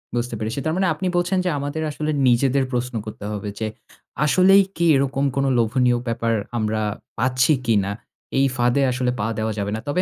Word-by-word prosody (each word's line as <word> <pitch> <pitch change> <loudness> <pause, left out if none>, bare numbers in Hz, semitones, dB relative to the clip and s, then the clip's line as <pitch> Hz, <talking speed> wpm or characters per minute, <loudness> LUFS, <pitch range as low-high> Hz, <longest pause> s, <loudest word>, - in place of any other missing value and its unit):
বুঝতে 120 -1 -2
পেরেছি। 110 +5 -3
তার 155 - 0
মানে 190 -1 +2
আপনি 185 +4 -3
বলছেন, 180 +2 +1
যে 180 - +2
আমাদের 145 +3 -3
আসলে 155 +1 -2 0.2
নিজেদের 130 +2 +3
প্রশ্ন 125 0 -2
করতে 105 -1 -8
হবে 105 0 -4
যে, 110 - -1 0.6
"আসলেই 190 +5 +6
কি 170 +1 0
এরকম 135 0 0
কোনো 135 0 +1
লোভনীয় 120 +2 +2
ব্যাপার 115 0 0 0.2
আমরা 110 -1 -1 0.4
পাচ্ছি 130 +4 +3
কিনা? 100 -4 +2 0.5
এই 135 - +4
ফাঁদে 120 +2 +2
আসলে 125 0 0
পা 105 - 0
দেওয়া 110 0 -1
যাবে 100 0 -2
না।" - - -4
তবে 145 +6 +1
125 Hz, 185 wpm, -22 LUFS, 115-145 Hz, 0.6 s, আসলেই